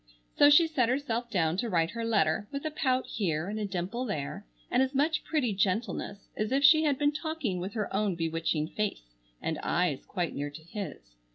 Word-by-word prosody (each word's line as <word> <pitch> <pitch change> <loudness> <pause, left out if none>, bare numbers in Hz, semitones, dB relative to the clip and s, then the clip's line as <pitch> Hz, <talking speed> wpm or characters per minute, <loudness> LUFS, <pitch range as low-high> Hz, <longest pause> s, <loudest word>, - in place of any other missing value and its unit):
So 290 - +7
she 295 +3 +7
set 265 -8 +1
herself 245 -3 -1
down 165 -4 +1
to 235 +4 -1
write 165 -3 +1
her 230 0 -4
letter, 205 -4 +1
with 280 +2 -5
a 310 - -1
pout 260 -4 +1
here 170 -5 -1
and 215 +2 -3
a 210 - -1
dimple 190 +6 -3
there, 150 - -4 0.2
and - - +4
as 265 +1 0
much 305 +3 +2
pretty 265 -9 0
gentleness 200 +1 -1
as 215 +2 -2
if 275 +1 +2
she 310 +2 +7
had 285 -3 +2
been 290 +1 +2
talking 300 - -3
with 190 +3 -5
her 215 -4 -3
own 200 -2 +1
bewitching 165 -1 -1
face 195 - -3 0.3
and - - -2
eyes - - 0
quite - - -2
near 145 +1 -3
to 150 +2 -11
his. 155 - -7
215 Hz, 205 wpm, -29 LUFS, 175-265 Hz, 0.3 s, So